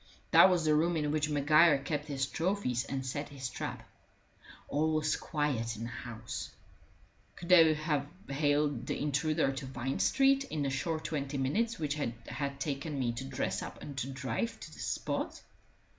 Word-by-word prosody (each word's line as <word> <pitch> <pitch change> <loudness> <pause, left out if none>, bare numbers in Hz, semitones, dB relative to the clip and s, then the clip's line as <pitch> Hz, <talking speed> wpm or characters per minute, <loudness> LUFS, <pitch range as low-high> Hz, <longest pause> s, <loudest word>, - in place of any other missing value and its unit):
That - - +9
was 175 -3 +2
the 155 - +4
room 165 +3 +2
in 150 -1 0
which 150 0 +1
Maguire 150 +1 +5
kept 150 +2 -3
his 135 -2 -1
trophies 160 - -1
and 135 -1 -3
set 145 +3 -3
his 135 -3 -5
trap. - - -5 0.8
All 155 +2 +1
was 155 0 +1
quiet 135 -8 -1
in 110 - -6
the 115 - -4
house: 120 -1 -6 0.9
could 170 - -9
they 165 -3 +7
have 150 -2 -1 0.2
haled 145 -2 +1
the - - -2
intruder 150 0 +1
to 135 0 -5
Vine 130 +1 -3
Street 275 0 +4
in 155 - -3
the 135 - 0
short 155 +4 -2
twenty 140 -2 -3
minutes 215 - 0
which 150 -1 -2
it 115 -5 -2
had 140 -1 -4
taken 140 +1 -3
me 125 -3 +1
to 120 +3 -5
dress 135 - -2
and 140 - -7
to 130 - -2
drive 135 - -3
to - - -9
the - - -13
spot? - - -2
145 Hz, 175 wpm, -32 LUFS, 135-155 Hz, 0.9 s, That